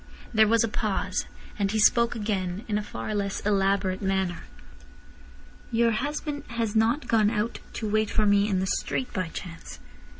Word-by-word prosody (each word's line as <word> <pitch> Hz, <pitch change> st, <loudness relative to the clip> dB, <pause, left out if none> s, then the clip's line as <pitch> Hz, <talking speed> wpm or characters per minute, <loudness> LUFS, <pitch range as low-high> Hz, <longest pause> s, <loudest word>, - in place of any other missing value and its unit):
There 220 Hz, -1 st, +5 dB
was 230 Hz, +1 st, +4 dB
a -, -, +1 dB
pause. 200 Hz, -3 st, -1 dB, 0.3 s
Then 200 Hz, -, +2 dB
he 220 Hz, -, 0 dB
spoke 235 Hz, +2 st, +4 dB
again, 200 Hz, -2 st, -2 dB
in 210 Hz, -1 st, 0 dB
a -, -, -4 dB
far 215 Hz, -, -5 dB
less 200 Hz, -1 st, -1 dB
elaborate 195 Hz, -1 st, +1 dB
manner. 190 Hz, -3 st, -1 dB, 1.3 s
"Your 230 Hz, 0 st, +3 dB
husband 290 Hz, +4 st, -3 dB
has 230 Hz, -2 st, -2 dB
not 230 Hz, +7 st, +2 dB
gone 215 Hz, -3 st, +4 dB
out 220 Hz, +1 st, -2 dB
to 220 Hz, -, -3 dB
wait 215 Hz, 0 st, +1 dB
for 215 Hz, -, +2 dB
me 205 Hz, 0 st, +4 dB
in 190 Hz, -2 st, +1 dB
the -, -, 0 dB
street 250 Hz, +6 st, -2 dB
by 185 Hz, -2 st, -1 dB
chance?" 165 Hz, 0 st, -8 dB
210 Hz, 170 wpm, -26 LUFS, 195-230 Hz, 1.3 s, There